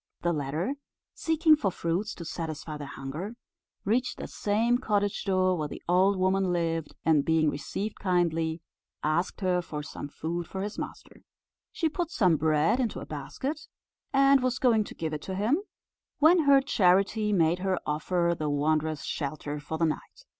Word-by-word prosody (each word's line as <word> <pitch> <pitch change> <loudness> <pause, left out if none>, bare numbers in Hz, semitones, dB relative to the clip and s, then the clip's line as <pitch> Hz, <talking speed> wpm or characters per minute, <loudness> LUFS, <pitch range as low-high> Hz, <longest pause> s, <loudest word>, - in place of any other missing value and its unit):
The 175 0 +2
latter, 155 - -2 0.4
seeking 320 -1 +4
for 220 -10 0
fruits 180 +4 -2
to 170 - -8
satisfy 155 -2 -5
their 145 -1 -6
hunger, 150 - -6 0.5
reached 240 +5 +1
the - - -5
same 230 +4 +1
cottage 205 -5 0
door 185 -1 +2
where 155 -3 -2
the - - -9
old 185 +3 +4
woman 185 0 +2
lived, 165 -2 -1
and 155 -3 +4
being 160 -1 +2
received 195 +8 -4
kindly, 165 -3 0 0.4
asked 165 +7 0
her 180 -2 +2
for 150 -3 -6
some 145 - -7
food 165 +3 -4
for 190 0 -4
his 205 +1 -5
master. - - -8 0.5
She 330 - 0
put 340 +1 -2
some 185 - +3
bread 155 - +2
into 240 -5 -1
a - - -7
basket, 265 - -5 0.4
and 275 0 +5
was 250 -1 0
going 225 -4 +3
to - - -10
give 160 -1 -3
it 150 - -3
to 190 - -5
him, 220 - +2 0.6
when 320 +2 +5
her 275 -1 +7
charity 205 -2 +2
made 170 -2 +3
her 190 0 0
offer 170 +3 0
the 155 -2 -2
wanderers 155 +1 0
shelter 145 +1 -4
for 160 +2 -5
the 165 - +2
night. 155 - -4
180 Hz, 170 wpm, -28 LUFS, 155-215 Hz, 0.6 s, her